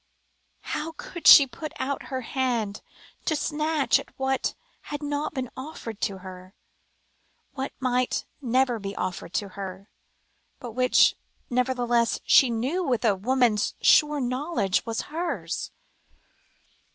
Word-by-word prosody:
How 320 Hz, +2 st, -4 dB
could 360 Hz, -4 st, -4 dB
she 280 Hz, -, +11 dB
put 305 Hz, +4 st, -8 dB
out 275 Hz, +1 st, -3 dB
her 260 Hz, -1 st, -3 dB
hand 235 Hz, -5 st, -2 dB, 0.4 s
to 315 Hz, -, +1 dB
snatch 305 Hz, 0 st, +1 dB
at -, -, -10 dB
what 265 Hz, 0 st, -1 dB, 0.3 s
had 290 Hz, 0 st, -5 dB
not 290 Hz, +2 st, -2 dB
been 255 Hz, -2 st, -3 dB
offered 260 Hz, -6 st, -8 dB
to 195 Hz, -, -1 dB
her, 185 Hz, +1 st, -11 dB, 1.0 s
what 270 Hz, 0 st, -4 dB
might 255 Hz, -1 st, 0 dB, 0.2 s
never 250 Hz, -1 st, +1 dB
be 195 Hz, -1 st, -6 dB
offered 180 Hz, -2 st, -4 dB
to 205 Hz, -, -1 dB
her, 195 Hz, +1 st, -8 dB, 0.7 s
but 240 Hz, -, -7 dB
which, 250 Hz, +2 st, +4 dB, 0.4 s
nevertheless, 245 Hz, -3 st, +1 dB
she 265 Hz, -, +6 dB
knew 260 Hz, +11 st, -1 dB
with 245 Hz, -7 st, 0 dB
a 215 Hz, -, +5 dB
woman's 235 Hz, 0 st, +1 dB
sure 300 Hz, -1 st, +5 dB
knowledge 255 Hz, -, 0 dB
was 225 Hz, -1 st, -1 dB
hers? 335 Hz, +3 st, -4 dB
255 Hz, 130 wpm, -26 LUFS, 225-290 Hz, 1.0 s, she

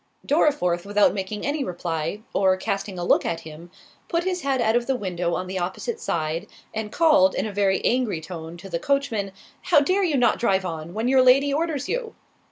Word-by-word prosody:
Dorriforth, 275 Hz, -, +2 dB
without 205 Hz, 0 st, +3 dB
making 200 Hz, +1 st, -4 dB
any 285 Hz, 0 st, -1 dB
reply, 170 Hz, 0 st, -3 dB
or 190 Hz, -1 st, +3 dB
casting 195 Hz, 0 st, -3 dB
a 175 Hz, -, -3 dB
look -, -, +3 dB
at 165 Hz, -1 st, -2 dB
him, 160 Hz, +2 st, -11 dB, 0.4 s
put 335 Hz, 0 st, 0 dB
his 365 Hz, -1 st, -2 dB
head 275 Hz, -2 st, 0 dB
out 220 Hz, -1 st, +2 dB
of 240 Hz, 0 st, +1 dB
the 270 Hz, -, +1 dB
window 180 Hz, -6 st, -2 dB
on 185 Hz, -, -3 dB
the 185 Hz, +1 st, -4 dB
opposite 190 Hz, -, -3 dB
side, 165 Hz, -, -2 dB, 0.3 s
and 220 Hz, -1 st, -4 dB
called, 300 Hz, -3 st, +4 dB
in -, -, -1 dB
a 210 Hz, -, -5 dB
very 195 Hz, -1 st, +1 dB
angry 245 Hz, -8 st, +1 dB
tone, 160 Hz, +1 st, -8 dB
to 175 Hz, -, -10 dB
the 170 Hz, -3 st, -3 dB
coachman, 255 Hz, -8 st, -1 dB, 0.3 s
"How 320 Hz, -, +5 dB
dare 370 Hz, +7 st, +1 dB
you 315 Hz, -6 st, +1 dB
not 245 Hz, -, +3 dB
drive 195 Hz, -5 st, +1 dB
on, 165 Hz, 0 st, -6 dB
when 225 Hz, +3 st, -1 dB
your 260 Hz, 0 st, +5 dB
Lady 275 Hz, +3 st, +5 dB
orders 300 Hz, -2 st, -1 dB
you?" 475 Hz, -2 st, -3 dB
210 Hz, 205 wpm, -24 LUFS, 180-280 Hz, 0.4 s, How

